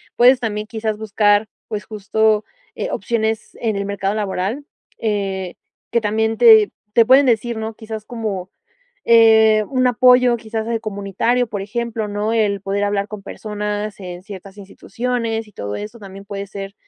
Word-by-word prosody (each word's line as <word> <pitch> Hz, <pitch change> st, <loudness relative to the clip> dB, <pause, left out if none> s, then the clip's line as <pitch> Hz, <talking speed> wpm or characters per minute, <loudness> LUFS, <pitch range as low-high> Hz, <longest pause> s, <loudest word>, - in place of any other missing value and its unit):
Puedes 250 Hz, +2 st, +6 dB
también 210 Hz, -3 st, -3 dB
quizás 220 Hz, -1 st, -3 dB
buscar, 210 Hz, 0 st, +2 dB, 0.2 s
pues 210 Hz, -2 st, -4 dB
justo, 215 Hz, +1 st, +1 dB, 0.3 s
eh, -, -, -3 dB
opciones 220 Hz, -2 st, -2 dB
en 220 Hz, -3 st, 0 dB
el 200 Hz, 0 st, -2 dB
mercado 200 Hz, 0 st, -2 dB
laboral, 205 Hz, +5 st, -2 dB, 0.3 s
eh, 195 Hz, -4 st, -2 dB, 0.4 s
que 235 Hz, -, +3 dB
también 220 Hz, +1 st, 0 dB
te, 220 Hz, -3 st, +7 dB, 0.2 s
te 230 Hz, +1 st, +5 dB
pueden 265 Hz, +4 st, +6 dB
decir 235 Hz, -1 st, +1 dB
¿no? 220 Hz, 0 st, -4 dB
Quizás 220 Hz, -1 st, -7 dB
como, 210 Hz, -6 st, -4 dB, 0.6 s
eh, 220 Hz, -2 st, +6 dB
un 255 Hz, -2 st, +1 dB
apoyo 250 Hz, 0 st, +5 dB
quizás 220 Hz, -1 st, -4 dB
de 230 Hz, -1 st, -1 dB
comunitario, 215 Hz, +4 st, -1 dB
por 205 Hz, -3 st, -5 dB
ejemplo, 220 Hz, +1 st, -3 dB
¿no? 205 Hz, +2 st, -2 dB
El 205 Hz, -4 st, +1 dB
poder 200 Hz, +1 st, -1 dB
hablar 205 Hz, -1 st, 0 dB
con 210 Hz, -1 st, -8 dB
personas 210 Hz, 0 st, -5 dB
en 180 Hz, -1 st, -8 dB
ciertas 195 Hz, -1 st, -11 dB
instituciones 225 Hz, +3 st, -3 dB
y 210 Hz, -, -19 dB
todo 100 Hz, -, -5 dB
eso 215 Hz, +3 st, -7 dB
también 195 Hz, -1 st, -11 dB
puede 200 Hz, 0 st, -6 dB
ser, 195 Hz, 0 st, -8 dB
215 Hz, 160 wpm, -19 LUFS, 200-225 Hz, 0.6 s, te